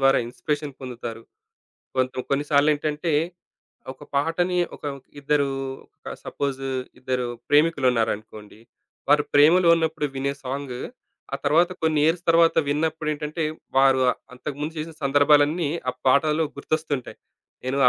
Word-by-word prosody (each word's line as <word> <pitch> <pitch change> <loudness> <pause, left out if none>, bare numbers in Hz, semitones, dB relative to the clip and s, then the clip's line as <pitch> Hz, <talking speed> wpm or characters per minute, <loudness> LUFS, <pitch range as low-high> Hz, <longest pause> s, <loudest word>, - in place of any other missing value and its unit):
ద్వారా 135 0 +5
ఇన్‌స్పిరేషన్ 145 +3 -3
పొందుతారు. 120 -3 -7 0.7
కొంత 130 0 +1 0.2
కొన్నిసార్లేంటంటే 150 +2 +1 0.8
ఒక 145 - -14
పాటని 175 +5 +1 0.2
ఒక - - -14 0.4
ఇద్దరు 140 0 +1 0.5
ఒక - - -8
సపోజ్ 140 -2 -3 0.4
ఇద్దరు 125 -1 -2 0.2
ప్రేమికులున్నారనుకోండి. 120 -8 +1 0.5
వారు 150 0 +5
ప్రేమలో 170 +5 +6
ఉన్నప్పుడు 160 -2 -1
వినే 140 +1 -1
సాంగు, 130 -1 -4 0.6
ఆ - - 0
తరువాత 170 +4 +4
కొన్ని 160 -2 +2
ఇయర్స్ 170 +2 +1
తరువాత 165 0 +5
విన్నప్పుడేంటంటే, 155 +1 -1 0.3
వారు 135 -1 +5 0.3
అంతకుముందు 150 +4 -5
చేసిన 160 +1 -5
సందర్భాలన్నీ 145 +3 +4 0.2
ఆ - - -10
పాటలో 150 +4 +3
గుర్తొస్తుంటాయి. 150 -3 -3 0.5
నేను 135 +2 -1
145 Hz, 105 wpm, -24 LUFS, 135-155 Hz, 0.8 s, ప్రేమలో